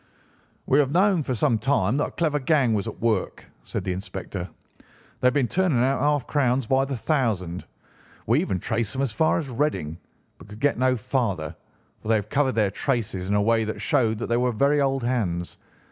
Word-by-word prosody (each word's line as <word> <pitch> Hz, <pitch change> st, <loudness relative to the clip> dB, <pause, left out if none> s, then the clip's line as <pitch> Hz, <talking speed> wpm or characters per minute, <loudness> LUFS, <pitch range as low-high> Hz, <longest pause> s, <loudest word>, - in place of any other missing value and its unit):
"We 135 Hz, -, +3 dB
have 140 Hz, -3 st, +3 dB
known 185 Hz, +1 st, +3 dB
for 130 Hz, -3 st, -2 dB
some 110 Hz, 0 st, +2 dB
time 125 Hz, -2 st, +1 dB
that 145 Hz, -, +1 dB
a -, -, -8 dB
clever 155 Hz, -3 st, 0 dB
gang 135 Hz, -4 st, +2 dB
was 105 Hz, +1 st, -1 dB
at 110 Hz, -, -7 dB
work," 110 Hz, -4 st, -1 dB, 0.2 s
said -, -, -4 dB
the 95 Hz, -, -1 dB
inspector. 95 Hz, -1 st, -6 dB, 0.7 s
"They 125 Hz, -, +3 dB
have 125 Hz, -, +3 dB
been 135 Hz, -4 st, +2 dB
turning 185 Hz, -5 st, +1 dB
out 135 Hz, +1 st, +1 dB
half 145 Hz, -2 st, +1 dB
crowns 130 Hz, -3 st, +1 dB
by 135 Hz, +3 st, +2 dB
the 135 Hz, -2 st, -4 dB
thousand. 110 Hz, -, -1 dB, 0.6 s
We -, -, +3 dB
even 95 Hz, -, -1 dB
traced 110 Hz, +3 st, -2 dB
them 135 Hz, +1 st, -1 dB
as 135 Hz, -, -1 dB
far 155 Hz, +9 st, +2 dB
as 160 Hz, -, -3 dB
Reading, 105 Hz, -, -2 dB, 0.4 s
but -, -, -13 dB
could 105 Hz, +1 st, -11 dB
get 145 Hz, -3 st, +1 dB
no 130 Hz, 0 st, +2 dB
farther, 100 Hz, -, -2 dB, 0.5 s
for -, -, -10 dB
they 110 Hz, -, +4 dB
had 105 Hz, 0 st, -2 dB
covered 140 Hz, -2 st, +1 dB
their 105 Hz, -3 st, +2 dB
traces 100 Hz, -4 st, -2 dB
in 100 Hz, -, +2 dB
a 105 Hz, -, +3 dB
way 115 Hz, +1 st, +2 dB
that 110 Hz, 0 st, -4 dB
showed 120 Hz, -8 st, +1 dB
that 115 Hz, -, -3 dB
they 120 Hz, -, 0 dB
were 125 Hz, 0 st, +1 dB
very 140 Hz, +5 st, +2 dB
old 135 Hz, -2 st, 0 dB
hands. 95 Hz, -9 st, -2 dB
120 Hz, 210 wpm, -24 LUFS, 105-140 Hz, 0.7 s, they